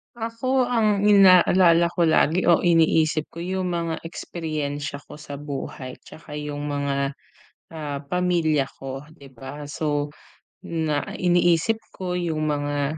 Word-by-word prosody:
Ako 240 Hz, +3 st, -1 dB
ang 220 Hz, -5 st, +1 dB
inaalala 185 Hz, -4 st, +6 dB
ko 170 Hz, -1 st, +1 dB
lagi 165 Hz, +2 st, +3 dB
o 170 Hz, -2 st, +5 dB
iniisip 160 Hz, -2 st, +3 dB
ko 170 Hz, -, -6 dB
'yong 185 Hz, +1 st, -2 dB
mga 170 Hz, -2 st, -2 dB
eksperyensya 145 Hz, -4 st, -4 dB
ko 150 Hz, -, -9 dB
sa 145 Hz, -1 st, -8 dB
buhay 140 Hz, -2 st, -6 dB
tsaka 150 Hz, -2 st, -9 dB
'yong 145 Hz, -1 st, -5 dB
mga, 140 Hz, -1 st, -2 dB, 0.5 s
ah, 145 Hz, -3 st, -5 dB
pamilya 160 Hz, -4 st, +1 dB
ko, 135 Hz, 0 st, -6 dB, 0.2 s
'di 140 Hz, -4 st, -15 dB
ba? 135 Hz, +4 st, -9 dB
So 145 Hz, 0 st, -2 dB, 0.5 s
na 160 Hz, -3 st, -1 dB
iniisip 175 Hz, +3 st, +2 dB, 0.2 s
ko 180 Hz, -1 st, -3 dB
'yong 165 Hz, -3 st, -2 dB
mga 145 Hz, +1 st, -1 dB
160 Hz, 130 wpm, -24 LUFS, 145-180 Hz, 0.5 s, inaalala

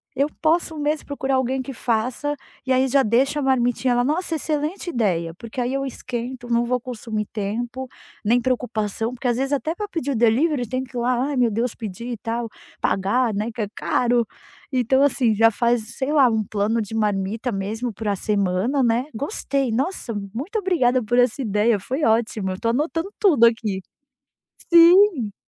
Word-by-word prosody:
eu 280 Hz, +2 st, +2 dB
posso 325 Hz, 0 st, +1 dB
mesmo 300 Hz, +1 st, -1 dB
procurar 270 Hz, -2 st, -1 dB
alguém 260 Hz, +1 st, 0 dB
que 270 Hz, +1 st, -7 dB
faça 245 Hz, +6 st, -1 dB, 0.3 s
e 260 Hz, -, -1 dB
aí 260 Hz, +1 st, +3 dB
já 275 Hz, +2 st, +4 dB
deixa 265 Hz, +6 st, +2 dB
a -, -, -1 dB
marmitinha 250 Hz, -1 st, +2 dB
lá. 245 Hz, -, +2 dB
Nossa, 320 Hz, +5 st, -1 dB
excelente 310 Hz, +4 st, -2 dB
ideia! 175 Hz, -9 st, 0 dB
Porque 230 Hz, +5 st, -8 dB
aí 245 Hz, +2 st, -1 dB
eu 275 Hz, -, -1 dB
esquento, 245 Hz, -1 st, -5 dB
não 235 Hz, 0 st, +2 dB
vou 250 Hz, +1 st, 0 dB
consumir 225 Hz, -3 st, -4 dB
tempo, 235 Hz, +5 st, -3 dB, 0.4 s
nem 235 Hz, +4 st, +4 dB
preocupação, 230 Hz, -2 st, -1 dB
porque 250 Hz, +1 st, -4 dB
às 240 Hz, -1 st, +1 dB
vezes 270 Hz, +2 st, -1 dB
até 310 Hz, +3 st, -1 dB
para 415 Hz, +2 st, -4 dB
pedir 305 Hz, -7 st, -3 dB
o -, -, -1 dB
delivery 245 Hz, +3 st, +2 dB
tem 255 Hz, +1 st, -2 dB
que 255 Hz, -1 st, -13 dB
ir -, -, 0 dB
lá, 250 Hz, +3 st, +1 dB
"ai, 285 Hz, -, -2 dB
meu 240 Hz, -2 st, +3 dB
Deus", 230 Hz, +2 st, -1 dB
pedir 225 Hz, +2 st, -6 dB
e 235 Hz, -, -4 dB
tal, 230 Hz, +2 st, -3 dB, 0.3 s
pagar, 220 Hz, +5 st, +1 dB
né, 210 Hz, +3 st, -2 dB
que 225 Hz, -, -4 dB
é 205 Hz, -, -1 dB
caro. 240 Hz, -1 st, +1 dB, 0.5 s
Então 260 Hz, +1 st, +2 dB
assim, 255 Hz, -5 st, +3 dB
já 225 Hz, +2 st, +6 dB
faz, 235 Hz, 0 st, 0 dB
sei 270 Hz, +2 st, -1 dB
lá, 275 Hz, -5 st, +5 dB
um 220 Hz, -1 st, 0 dB
plano 210 Hz, +3 st, 0 dB
de 210 Hz, +1 st, -6 dB
marmita 210 Hz, +2 st, -1 dB
mesmo 220 Hz, +4 st, -3 dB
para 210 Hz, 0 st, -2 dB
a -, -, -2 dB
semana, 205 Hz, +7 st, 0 dB
né, 235 Hz, +2 st, +2 dB
gostei, 275 Hz, -, -1 dB
nossa, 260 Hz, +1 st, -2 dB, 0.2 s
muito 310 Hz, -, -3 dB
obrigada 260 Hz, -, +2 dB
por 240 Hz, +3 st, 0 dB
essa 245 Hz, +2 st, +2 dB
ideia, 210 Hz, -1 st, +2 dB
foi 265 Hz, +10 st, -3 dB
ótimo, 220 Hz, -4 st, +1 dB
eu 185 Hz, -, -3 dB
estou 230 Hz, -, -1 dB
anotando 325 Hz, -, -1 dB
tudo 300 Hz, -, +5 dB
aqui. 220 Hz, -5 st, +1 dB, 0.9 s
Sim. 340 Hz, -, +6 dB
245 Hz, 190 wpm, -22 LUFS, 225-275 Hz, 0.9 s, já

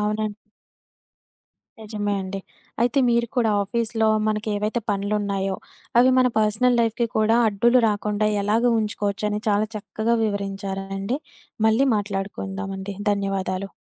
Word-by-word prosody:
అవునండి. 210 Hz, 0 st, -1 dB, 1.5 s
నిజమే 210 Hz, -1 st, -2 dB
అండి. 190 Hz, +1 st, -5 dB, 0.4 s
అయితే 245 Hz, +4 st, +2 dB
మీరు 235 Hz, 0 st, +2 dB
కూడా 230 Hz, -3 st, +3 dB
ఆఫీస్‌లో 225 Hz, +1 st, 0 dB, 0.2 s
మనకెవైతే 215 Hz, +1 st, -1 dB
పనులున్నాయో, 200 Hz, -1 st, -1 dB, 0.4 s
అవి 255 Hz, +1 st, +6 dB
మన 255 Hz, -, +5 dB
పర్సనల్ 220 Hz, +3 st, +2 dB
లైఫ్‌కి 230 Hz, +1 st, +1 dB
కూడా 220 Hz, +1 st, +3 dB
అడ్డులు 235 Hz, +5 st, +3 dB
రాకుండా 210 Hz, 0 st, 0 dB
ఎలాగ 215 Hz, +4 st, +1 dB
ఉంచుకోవచ్చని, 210 Hz, 0 st, -1 dB
చాలా 210 Hz, +1 st, +2 dB
చక్కగా 220 Hz, +2 st, -1 dB
వివరించారండి. 195 Hz, +2 st, -3 dB, 0.5 s
మళ్ళీ 225 Hz, +5 st, +4 dB
మాట్లాడుకుందామండి. 195 Hz, -1 st, -4 dB, 0.2 s
ధన్యవాదాలు. 195 Hz, -1 st, -2 dB
210 Hz, 105 wpm, -23 LUFS, 200-220 Hz, 1.5 s, అవి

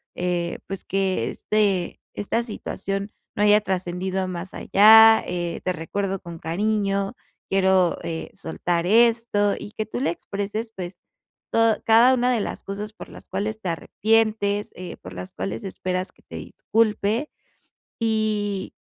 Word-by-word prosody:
eh, 175 Hz, -1 st, -1 dB
pues, 195 Hz, -1 st, -5 dB
que 190 Hz, -1 st, 0 dB
este 200 Hz, -5 st, 0 dB, 0.2 s
esta 205 Hz, +3 st, -1 dB
situación, 200 Hz, -3 st, -4 dB, 0.2 s
no -, -, -2 dB
haya 210 Hz, 0 st, +6 dB
trascendido 185 Hz, 0 st, -2 dB
más 180 Hz, 0 st, -6 dB
allá. 220 Hz, +2 st, +7 dB
Eh, 175 Hz, -1 st, -3 dB
te 185 Hz, -, 0 dB
recuerdo 195 Hz, +4 st, -3 dB
con 170 Hz, -1 st, -9 dB
cariño. 200 Hz, +3 st, 0 dB, 0.4 s
Quiero, 190 Hz, -2 st, +3 dB
eh, 160 Hz, -1 st, -4 dB
soltar 170 Hz, +1 st, -2 dB
esto". 230 Hz, -2 st, +3 dB
Y 205 Hz, -, -8 dB
que 215 Hz, -, -3 dB
tú -, -, -4 dB
le 255 Hz, -, +1 dB
expreses, 205 Hz, +5 st, -4 dB
pues, 180 Hz, -1 st, -7 dB, 0.5 s
to 225 Hz, -1 st, +3 dB
cada 230 Hz, +3 st, +6 dB
una 250 Hz, 0 st, +2 dB
de 230 Hz, -, +1 dB
las -, -, -5 dB
cosas, 205 Hz, +2 st, -5 dB
por -, -, -11 dB
las -, -, -13 dB
cuales 210 Hz, +3 st, -3 dB
te 185 Hz, -, -2 dB
arrepientes, 210 Hz, +3 st, +1 dB
eh, 180 Hz, -1 st, -8 dB
por 90 Hz, -, -11 dB
las 90 Hz, 0 st, -8 dB
cuales 100 Hz, +4 st, -4 dB
esperas 185 Hz, -1 st, -3 dB
que -, -, -27 dB
te -, -, -11 dB
disculpe, 220 Hz, +4 st, 0 dB, 0.7 s
y 215 Hz, -3 st, -1 dB
200 Hz, 145 wpm, -24 LUFS, 180-215 Hz, 0.7 s, allá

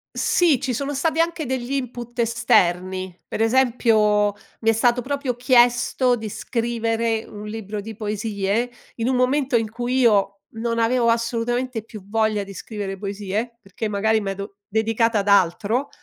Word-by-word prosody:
Sì, 325 Hz, -8 st, +3 dB
ci 260 Hz, -3 st, -2 dB
sono 280 Hz, +4 st, -2 dB
stati 315 Hz, +3 st, 0 dB
anche 330 Hz, -3 st, 0 dB
degli 255 Hz, 0 st, -3 dB
input 245 Hz, -3 st, -4 dB
esterni. 185 Hz, -5 st, +1 dB
Per -, -, -5 dB
esempio, 225 Hz, -4 st, +3 dB, 0.3 s
mi 225 Hz, -, -1 dB
è -, -, +7 dB
stato 240 Hz, +2 st, +2 dB
proprio 275 Hz, -1 st, -2 dB
chiesto 245 Hz, 0 st, +3 dB
di 220 Hz, -2 st, -5 dB
scrivere 230 Hz, 0 st, -1 dB
un 210 Hz, 0 st, -9 dB
libro 210 Hz, -1 st, -5 dB
di 220 Hz, +1 st, -8 dB
poesie, 210 Hz, +1 st, -1 dB, 0.3 s
in 230 Hz, +1 st, -1 dB
un 260 Hz, -, +1 dB
momento 260 Hz, +1 st, +2 dB
in 225 Hz, -2 st, 0 dB
cui 245 Hz, +3 st, -1 dB
io 200 Hz, -4 st, +3 dB
non 230 Hz, +1 st, -3 dB
avevo 235 Hz, +1 st, +2 dB
assolutamente 230 Hz, +1 st, 0 dB
più 215 Hz, -2 st, -11 dB
voglia 215 Hz, -1 st, +1 dB
di 195 Hz, -, -10 dB
scrivere 195 Hz, 0 st, -6 dB
poesie, 205 Hz, +4 st, -4 dB
perché 200 Hz, +3 st, -5 dB
magari 220 Hz, +2 st, +1 dB
medo 200 Hz, 0 st, -5 dB
dedicata 225 Hz, 0 st, +1 dB
ad 200 Hz, -, -3 dB
altro. 200 Hz, +7 st, +2 dB
225 Hz, 155 wpm, -22 LUFS, 210-245 Hz, 0.3 s, è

